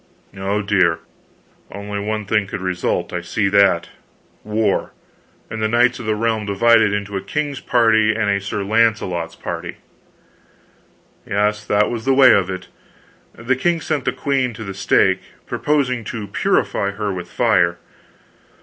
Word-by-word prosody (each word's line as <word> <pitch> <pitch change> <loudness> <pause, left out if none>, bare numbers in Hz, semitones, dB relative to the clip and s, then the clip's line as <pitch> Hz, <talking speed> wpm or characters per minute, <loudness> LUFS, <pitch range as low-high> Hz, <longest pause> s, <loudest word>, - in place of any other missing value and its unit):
"Oh, 100 +2 -2
dear, 95 -5 +2 0.7
only 100 0 -5
one 110 +1 -3
thing 105 -1 +1
could - - -5
result 90 -2 -2
I 90 - -2
see 100 +4 -1
that. 100 -3 +3 0.5
War, 105 -1 -1 0.5
and 110 - -6
the 110 - +2
knights 120 +3 +2
of 120 - -7
the 110 - +1
realm 110 -1 -1
divided 110 +1 +4
into 105 0 -3
a 95 - -2
king's 145 +6 -3
party 110 -3 +3
and 110 -2 0
a 100 0 +1
Sir 100 0 -3
Launcelot's 100 -6 0
party." - - -6 1.5
"Yes 105 +1 0
that 105 0 +2
was 115 -2 -5
the 135 0 +3
way 130 -1 +7
of 95 -2 +2
it. 95 -1 -6 0.7
The 120 +4 -1
king 170 +6 0
sent 155 -4 -2
the 125 - +2
queen 130 -2 -1
to 110 - -7
the 95 -2 -6
stake, 95 -1 +2 0.2
proposing 135 -5 0
to 105 +1 -5
purify 100 0 0
her 105 -1 -3
with 90 -1 -6
fire. 90 -8 +2
105 Hz, 155 wpm, -19 LUFS, 100-115 Hz, 1.5 s, way